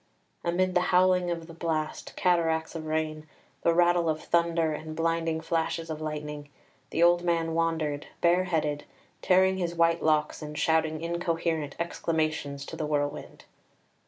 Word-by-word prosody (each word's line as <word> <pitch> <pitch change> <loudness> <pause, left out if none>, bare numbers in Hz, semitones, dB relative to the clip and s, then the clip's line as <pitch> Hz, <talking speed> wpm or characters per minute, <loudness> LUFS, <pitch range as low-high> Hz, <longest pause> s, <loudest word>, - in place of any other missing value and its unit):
Amid 185 +2 +1
the 180 - +3
howling 180 0 +4
of 170 -1 -3
the 165 - -11
blast, 160 -2 -3
cataracts 165 -3 +1
of 160 -2 -6
rain, 155 0 -2 0.3
the 170 - +3
rattle 175 0 +3
of 155 0 0
thunder, 170 -2 +1
and 155 +1 -6
blinding 165 0 0
flashes 165 0 -2
of 155 0 -5
lightning, 150 -1 -5 0.4
the 165 - +1
old 175 0 +5
man 165 -2 0
wandered, 160 -3 -1
bareheaded, 170 -4 +1 0.4
tearing 190 0 +4
his 175 -2 -2
white 165 0 +3
locks, 155 0 +1
and 150 0 -7
shouting 160 0 +1
incoherent 165 -3 -1
exclamations 155 -4 -2
to - - -7
the 155 -2 -3
whirlwind. 145 -1 -3
165 Hz, 145 wpm, -28 LUFS, 155-170 Hz, 0.4 s, old